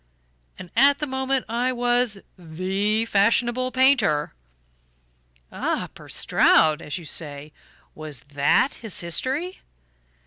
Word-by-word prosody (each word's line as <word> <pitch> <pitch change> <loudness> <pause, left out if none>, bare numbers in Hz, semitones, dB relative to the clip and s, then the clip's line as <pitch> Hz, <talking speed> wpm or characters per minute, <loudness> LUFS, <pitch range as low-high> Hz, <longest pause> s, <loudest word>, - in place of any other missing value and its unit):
And 180 -2 -11
at 280 +3 +5
the 300 - -3
moment 265 -1 -2
I 240 +3 -1
was 245 -3 0 0.2
THE 190 +6 -2
fashionable 235 +4 +1
painter." 255 - +2 1.2
"Ah, - - -2
poor - - -14
Stroud 155 0 +3
as 150 - -5
you 175 - -10
say. 150 -1 -4 0.4
Was 155 -4 -8
THAT 145 - +1
his 220 -5 -2
history?" 265 - -3
220 Hz, 110 wpm, -23 LUFS, 160-255 Hz, 1.2 s, at